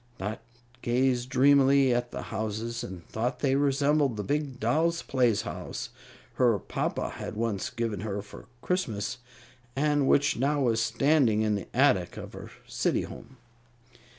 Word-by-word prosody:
Dot 105 +3 -4 0.4
gazed 125 0 +1
dreamily 135 0 +5
at 120 0 -1
the - - -6
houses 110 +2 -3
and 90 -3 -8
thought 125 +3 -3
they 135 -2 +2
resembled 140 -2 +2
the 105 - -2
big 145 +1 -2
doll's 160 +9 +1
playhouse 120 -6 -1 0.5
her 120 -4 +5
papa - - -3
had - - -6
once 110 +1 -2
given 115 -6 -3
her 100 -1 -4
for 100 0 -13 0.2
Christmas, 120 - -2 0.6
and 145 0 +2
which 145 - +3
now 145 +4 +1
was 115 -3 +2
standing 125 -4 +3
in 105 -1 +1
the 100 -3 -3
attic - - +2
of - - -8
her - - -9 0.2
city - - 0
home. 130 +3 -11
125 Hz, 145 wpm, -28 LUFS, 110-140 Hz, 0.6 s, dreamily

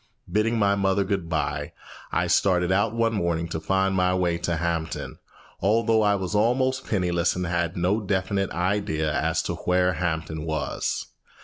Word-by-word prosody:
Bidding 110 +2 +1
my 100 -2 +3
mother 100 0 +1
good 95 -3 -2
by, 80 -2 -2 0.4
I - - +1
started 90 -2 +2
out 105 +4 +2
one 115 0 +1
morning 85 -4 -1
to 80 - -3
find 95 +3 +1
my 90 -1 +2
way 90 -2 0
to 85 -1 -1
Hampton, 85 -1 -3 0.4
although 110 +2 +3
I 105 -1 +3
was 95 0 -3
almost 130 +5 +1
penniless 90 -4 +1
and 90 0 -2
had 85 +1 -1
no 95 +5 +1
definite 100 -1 -1
idea 90 -4 -1
as - - 0
to - - -2
where 90 0 +1
Hampton 80 -2 -2
was. 80 -2 -2
90 Hz, 165 wpm, -25 LUFS, 85-100 Hz, 0.4 s, my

